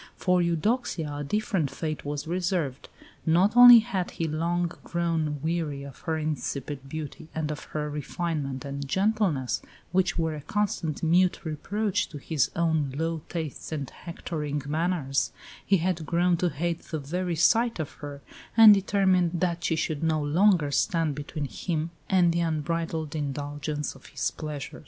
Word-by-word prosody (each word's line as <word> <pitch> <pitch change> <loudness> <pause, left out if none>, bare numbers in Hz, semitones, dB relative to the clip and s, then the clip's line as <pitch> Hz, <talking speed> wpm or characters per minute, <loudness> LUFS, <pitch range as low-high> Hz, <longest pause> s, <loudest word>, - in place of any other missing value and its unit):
For 180 -1 +2
Eudoxia 170 - 0
a 145 - -3
different 190 -2 0
fate 155 +3 -4
was 145 0 -4
reserved. 170 -5 -2 0.3
Not 180 +7 +3
only 245 0 +11
had 195 -6 -2
he 165 - -3
long 170 +2 0
grown 165 -4 -1
weary 160 -4 -1
of 140 -1 -10
her 160 - +1
insipid 145 -3 -3
beauty 155 0 -6
and 155 -1 -1
of 150 - -6
her 150 -1 -3
refinement 150 -2 -3
and 140 0 -5
gentleness, 190 - +1 0.3
which 180 0 +1
were 160 -2 0
a 150 - -6
constant 170 -3 -2
mute 175 +3 +3
reproach 200 +6 -1
to 150 - -8
his 145 0 0
own 160 -5 +1
low 165 0 -1
tastes 160 -4 -5
and 145 -4 -3
hectoring 150 -4 -5
manners 155 -2 0 0.3
he 195 - +3
had 170 -1 -1
grown 175 +3 +2
to 180 +1 +1
hate 170 +2 -2
the 160 - -5
very 170 +5 -2
sight 230 +8 +3
of 155 -3 -4
her, 145 -1 -7 0.4
and 220 -2 +11
determined 185 -3 +2
that 175 -1 0
she 165 - +1
should 155 -2 -2
no 160 -1 +2
longer 160 +1 +3
stand 165 -1 +1
between 145 +1 -5
him 160 +3 -3 0.2
and 180 -3 +4
the 170 - 0
unbridled 160 -1 -2
indulgence 145 0 -3
of 135 - -16
his 140 0 -2
pleasure. 150 -3 -6
160 Hz, 155 wpm, -27 LUFS, 145-175 Hz, 0.4 s, only